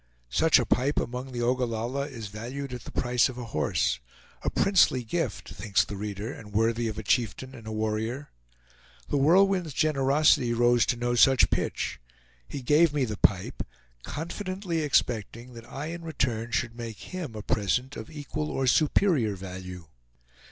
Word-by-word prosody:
Such 160 - +5
a 125 - +1
pipe 130 +7 +1
among 125 +2 -4
the 120 -1 -3
Ogallalla 125 +2 -1
is 115 -5 -7
valued 125 +6 -6
at 125 - -7
the - - -8
price 125 0 +2
of 125 - -8
a 125 - -5
horse. 75 - 0 0.4
A - - 0
princely 180 -10 +3
gift, 165 +9 -3
thinks 100 -5 +1
the 105 - -7
reader, 105 +4 -4
and 105 -2 -11
worthy 115 +2 +1
of 110 - -4
a 110 - -4
chieftain 125 +4 0
and 115 -4 -11
a - - -4
warrior. 110 +5 -2 0.8
The - - +1
Whirlwind's 180 +2 +4
generosity 140 -4 +3
rose 120 0 +3
to - - +2
no 120 0 0
such 130 +2 +5
pitch. - - -1 0.5
He 135 - -6
gave 150 +4 +4
me 140 -3 +2
the 110 -3 -4
pipe, 95 -2 +1 0.4
confidently 175 - -4
expecting 120 -4 0
that 115 +2 -12
I 150 +4 -4
in 170 - -7
return 130 -8 -2
should 115 -1 -1
make 115 - -8
him 165 -11 -5
a 105 - -6
present 125 +8 0
of 110 - -7
equal 150 0 -4
or 135 - -1
superior 145 - +3
value. 90 -2 -8
125 Hz, 165 wpm, -27 LUFS, 110-145 Hz, 0.8 s, Such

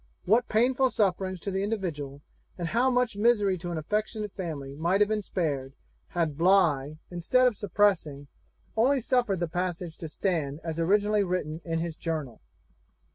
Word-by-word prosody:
What 225 +6 +3
painful 255 +4 +3
sufferings 190 -4 0
to 200 - -3
the 190 0 -1
individual, 160 -10 -3 0.3
and 170 -2 -3
how 245 +6 +3
much 250 -3 +1
misery 205 -3 +3
to 175 +1 -5
an 170 - -3
affectionate 210 +5 -2
family 150 -8 -5
might 170 +6 +1
have 210 - +5
been 215 -1 0
spared, 145 -9 -2 0.3
had 160 -4 -2
Bligh, 160 -6 +3
instead 180 +9 +2
of 245 -3 +3
suppressing, 190 -8 +1 0.5
only 260 +5 +3
suffered 240 -6 +1
the 175 - 0
passage 175 0 -3
to 160 - -6
stand 155 -5 -1
as 165 -1 -4
originally 205 +4 +3
written 175 -4 -2
in 165 -1 -2
his 165 -1 -3
journal! 155 -8 -4
180 Hz, 160 wpm, -28 LUFS, 160-210 Hz, 0.5 s, have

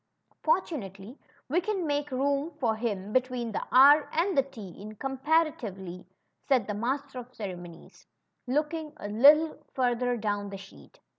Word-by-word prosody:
^^Fortunately, 245 - -2 0.3
we 330 +7 +1
can 385 -2 -2
make 290 -1 -1
room 280 +3 0
for 230 -5 +1
him 210 -3 -3
between 250 -2 0
the - - -2
R 285 +4 +7
and 355 +3 +1
the 275 - +5
T 230 -8 -10
in 210 +4 -10
com 270 +4 -5
paritively 265 - -1 0.4
said 255 -7 +3
the 210 - -3
Master 260 +5 -3
of 250 0 -10
Ceremonies^ 175 -6 -9 0.4
looking 300 +3 -1
a 205 - -6
little 295 +9 +5
further 245 -1 +1
down 205 -2 -2
the 195 - -7
sheet. 195 0 -15
255 Hz, 150 wpm, -28 LUFS, 210-295 Hz, 0.4 s, R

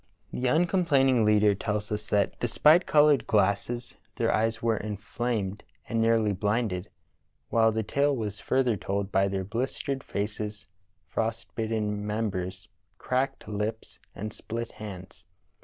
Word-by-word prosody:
The 125 - -1
uncomplain 165 -2 +3
ing 120 -4 +3
leader 105 -1 +5
tells 105 +2 -3
us 105 0 -3
that 100 -1 +1
despite 150 +8 +4
colored 150 -2 +5
glasses 105 +4 0 0.2
their - - +1
eyes 115 +1 +1
were 115 -1 +1
inflamed 105 -1 -3 0.2
and 115 -1 0
nearly 115 -2 +3
blinded, 105 -2 -1 0.6
while 110 -1 +4
the 110 0 -1
tale 140 +5 +1
was 105 -4 -4
further 130 -2 +1
told 100 +1 -3
by 95 0 +3
their 95 -1 -2
blistered 130 +6 -3
faces, 105 +1 -4 0.4
frost 110 +6 -3
bitten 110 -2 -2
mem 105 +1 -1
bers, 95 +1 -5 0.3
cracked 130 +2 -1
lips, 105 +2 -4 0.2
and 105 +2 -5
split 115 +1 -5
hands. 95 -5 -9
110 Hz, 140 wpm, -28 LUFS, 105-120 Hz, 0.6 s, leader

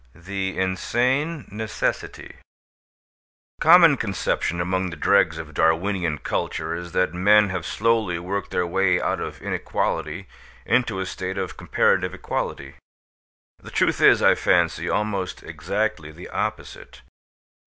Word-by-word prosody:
THE 95 +2 -4
INSANE 125 - 0
NECESSITY 110 +1 -4 1.2
The - - -31
common 165 -3 +7
conception 95 -5 -2
among 95 +1 -1
the 85 - -7
dregs 95 -5 +2
of 80 -1 -8
Darwinian 85 +1 +1
culture 80 - -3
is 85 0 -6
that 90 -3 +1
men 105 +3 +4
have 90 -3 -4
slowly 110 -5 +1
worked 95 +3 -4
their 90 - 0
way 90 +1 +2
out - - -1
of - - -7
inequality 85 +5 -2 0.4
into 115 -6 +1
a 95 - -2
state 95 +1 -5
of 95 -2 -4
comparative 90 +1 +1
equality. 70 -6 -4 0.8
The - - -11
truth - - +1
is, - - +6
I - - +6
fancy, - - +1
almost 100 -3 -2
exactly 85 +1 -3
the 85 +3 -11
opposite. - - -5
95 Hz, 130 wpm, -23 LUFS, 85-105 Hz, 1.2 s, common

